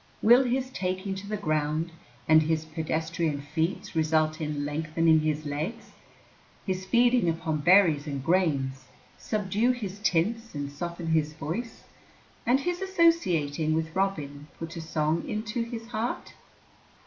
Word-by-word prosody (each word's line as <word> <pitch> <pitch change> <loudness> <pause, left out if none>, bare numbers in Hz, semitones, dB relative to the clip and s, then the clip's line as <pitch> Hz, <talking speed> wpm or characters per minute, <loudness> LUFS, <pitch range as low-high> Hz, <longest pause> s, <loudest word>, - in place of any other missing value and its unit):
Will 240 +4 +7
his 255 +1 -1
taking 185 -1 -2
to 195 +1 -7
the 210 0 -2
ground 155 -2 -1 0.4
and 155 0 +7
his 160 0 0
pedestrian 160 0 -2
feats 165 +7 -3
result 155 0 +1
in 150 -2 -2
lengthening 160 +2 +2
his 155 0 -1
legs, 155 +11 -4 0.7
his 185 -1 -3
feeding 240 -2 +4
upon 160 -1 -1
berries 165 -2 +5
and 140 -2 -4
grains 140 -7 +1 0.3
subdue 210 +2 0
his 205 -5 -6
tints 215 +3 0
and 145 -1 -4
soften 170 +3 -5
his 155 -1 +1
voice, 170 +10 -5 0.6
and 255 +3 +4
his 355 +3 -2
associating 180 - +2
with 160 0 -2
Robin 150 -7 -2
put 165 0 -7
a 165 - -5
song 160 0 0
into 215 +2 -2
his 230 -1 -6
heart? 235 0 -3
165 Hz, 135 wpm, -27 LUFS, 155-210 Hz, 0.7 s, Will